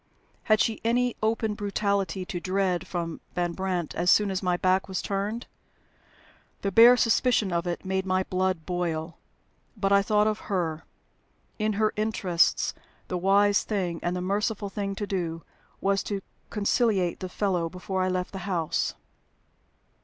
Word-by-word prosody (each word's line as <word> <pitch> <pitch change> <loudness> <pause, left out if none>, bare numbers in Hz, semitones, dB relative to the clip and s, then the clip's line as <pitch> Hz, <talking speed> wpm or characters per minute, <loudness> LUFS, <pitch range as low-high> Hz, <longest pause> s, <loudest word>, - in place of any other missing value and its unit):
Had 215 -1 +4
she 225 - +1
any 245 +1 +1
open 220 0 0
brutality 200 -2 -1
to 180 - -4
dread 185 -1 0
from 170 -3 -4
Van 175 -1 0
Brandt 180 -2 -2
as 175 +1 0
soon 205 +1 +5
as 190 - -2
my 180 -2 +1
back 185 +1 +2
was 190 -1 -3
turned? 205 +4 -2 1.2
The 200 - 0
bare 235 +5 +8
suspicion 230 -4 +2
of 170 +1 -1
it 175 +2 -3
made 190 0 0
my 185 0 +2
blood 185 -3 -1
boil. 170 -2 -3 0.6
But 195 -1 0
I 200 0 +6
thought 210 +1 +2
of 215 0 0
her. 165 -5 -1 0.7
In 215 0 +1
her 215 +1 +1
interests, 205 -5 +1 0.4
the 180 - -1
wise 200 +2 +4
thing 180 -6 -2
and 175 +1 -1
the 180 - -2
merciful 205 +2 -1
thing 195 -1 -3
to 205 - -3
do 170 -4 -3 0.4
was 195 0 +2
to 200 -2 -3 0.3
conciliate 205 -4 +1
the 185 - -5
fellow 180 -4 0
before 185 +2 -3
I 185 - +1
left 180 0 -2
the 195 - -6
house. 165 -4 0
190 Hz, 160 wpm, -27 LUFS, 180-210 Hz, 1.2 s, bare